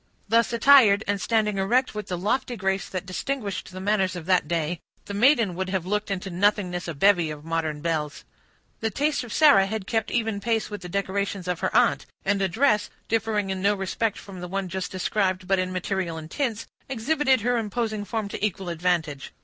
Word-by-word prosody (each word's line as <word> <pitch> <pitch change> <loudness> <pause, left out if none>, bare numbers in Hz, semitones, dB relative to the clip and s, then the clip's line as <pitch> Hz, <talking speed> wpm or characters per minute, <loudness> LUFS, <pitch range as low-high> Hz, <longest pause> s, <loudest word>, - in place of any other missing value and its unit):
Thus 230 +2 +3
attired, 230 -4 +6
and 200 -1 0
standing 210 -1 +1
erect 245 +7 +2
with 210 0 -5
the 180 - -3
lofty 245 +7 -1
grace 190 0 -1
that 185 0 -4
distinguished 200 +1 -4
the 185 - -8
manners 190 -1 +1
of 175 -3 -6
that 180 -4 +2
day, 170 0 -1 0.3
the 205 - -6
maiden 230 -2 +4
would 185 +2 -3
have 185 -2 -1
looked 210 +3 -1
into 195 -1 -3
nothingness 180 -2 +1
a 170 - -4
bevy 175 0 +4
of 150 0 -8
modern 160 -2 -2
belles. 155 -3 -2 0.6
The 225 - -1
taste 290 +5 0
of 240 - -9
Sarah 280 -11 +6
had 215 -1 -4
kept 225 -1 -1
even 225 -3 -1
pace 225 +1 -1
with 205 -2 -6
the 180 - -8
decorations 200 0 -2
of 180 -1 -1
her - - -2
aunt; 245 -1 +2 0.2
and 200 0 +1
a 195 - +2
dress, 215 +2 +2 0.2
differing 215 -3 0
in 190 -1 -3
no 200 +2 +3
respect 200 +3 -1
from 195 -2 -10
the 180 - -5
one 195 0 -3
just 190 +1 -4
described, 185 0 -1
but 195 -1 +2
in 185 0 -1
material 185 -2 -2
and 155 0 -9
tints, 235 -6 -2 0.2
exhibited 265 0 +1
her 245 +2 +1
imposing 215 0 -2
form 220 0 -3
to - - -6
equal 195 -3 -1
advantage. 170 -4 -1
195 Hz, 205 wpm, -25 LUFS, 180-220 Hz, 0.6 s, attired